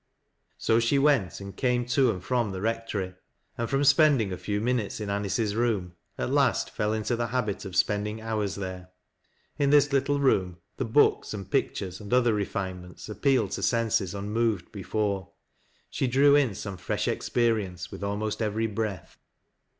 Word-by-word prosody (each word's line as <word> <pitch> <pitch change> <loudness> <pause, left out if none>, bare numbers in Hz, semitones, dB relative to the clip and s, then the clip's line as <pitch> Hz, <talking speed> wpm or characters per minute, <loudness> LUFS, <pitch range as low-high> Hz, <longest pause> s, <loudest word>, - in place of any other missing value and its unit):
So 115 - +2
she 115 +4 +2
went 135 - +2
and 100 -1 -8
camo 125 -2 +1
to 125 +1 +2
and 90 -5 -3
from 120 0 0
the 95 - -5
Rectory; 110 -3 -2 0.4
and 115 -1 -3
from 140 0 +1
spending 140 - +4
a - - -4
few 105 +3 -2
min 125 +3 +1
utes 105 0 -5
m 105 -2 -4
Anice's 100 +1 -1
room, 110 -7 0 0.2
at - - -2
last - - +2
fell 105 0 -1
into 110 +2 -1
the 120 0 -1
habit 115 -5 -2
of 95 -2 -7
spend 105 +3 +2
ing 105 +1 -4
houi 110 -1 -2
s 100 - -4
there. 95 -2 -6 0.7
In 140 -1 +3
this 145 0 +4
little 140 +1 +2
room 95 -10 +2 0.2
the - - -1
books, 115 -2 +3
and 100 -2 -8
pictures, 90 0 -1
and 105 - -9
othei 120 -2 +4
refinements 95 -3 -4
appealed 130 +6 +1
to - - -3
senses 110 -5 +1
un 100 +1 -4
moved 110 -5 0
before. 100 -1 -2 0.6
She 135 - 0
drew 140 +3 +5
in 135 -8 +2
some 100 -1 -6
fresh 90 - -2
experience 105 -7 -1
with - - -7
almost 105 +2 -2
every 110 +1 0
breath. 105 -4 -4
110 Hz, 180 wpm, -27 LUFS, 100-120 Hz, 0.7 s, drew